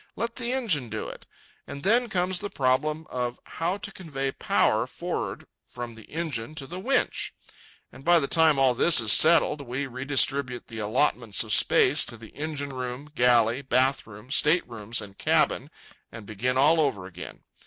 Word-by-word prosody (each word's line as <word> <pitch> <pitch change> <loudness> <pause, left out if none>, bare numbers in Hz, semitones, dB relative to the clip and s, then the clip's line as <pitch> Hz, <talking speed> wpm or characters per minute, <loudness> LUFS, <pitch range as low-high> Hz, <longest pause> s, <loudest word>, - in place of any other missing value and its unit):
Let 230 +2 -4
the 245 -1 -3
engine 195 - 0
do - - -5
it. - - -12 0.4
And 140 - -8
then 235 +4 +2
comes 180 -2 0
the 205 - -5
problem 150 +4 -1
of 125 -1 -3
how 175 +4 -3
to 205 -1 -7
convey 140 -9 -5
power - - +1
for'ard - - -5 0.2
from 120 -1 -8
the 115 -1 -14
engine 155 -5 -5
to 140 - -5
the 175 +6 -8
winch. 250 +6 -1 0.6
And 135 - -14
by 175 +2 +5
the 145 -4 0
time 160 -2 +4
all 135 -2 +3
this 155 +5 +6
is 110 -3 +6
settled, 160 -2 +5
we 135 +1 -4
redistribute 135 0 0
the 115 -2 -7
allotments 115 0 +1
of - - 0
space - - +4
to 120 - -9
the 110 -1 -13
engine 145 -2 -5
room, 130 +3 -6
galley, 120 -2 +3
bath 130 0 +1
room, 105 +4 -13
state 150 +5 +2
rooms, 115 -1 -5
and 100 -1 -12
cabin, - - +1 0.4
and 115 -2 -10
begin 120 +5 -2
all 155 +4 +4
over 105 -11 -1
again. 90 -1 -10
135 Hz, 175 wpm, -26 LUFS, 120-160 Hz, 0.6 s, this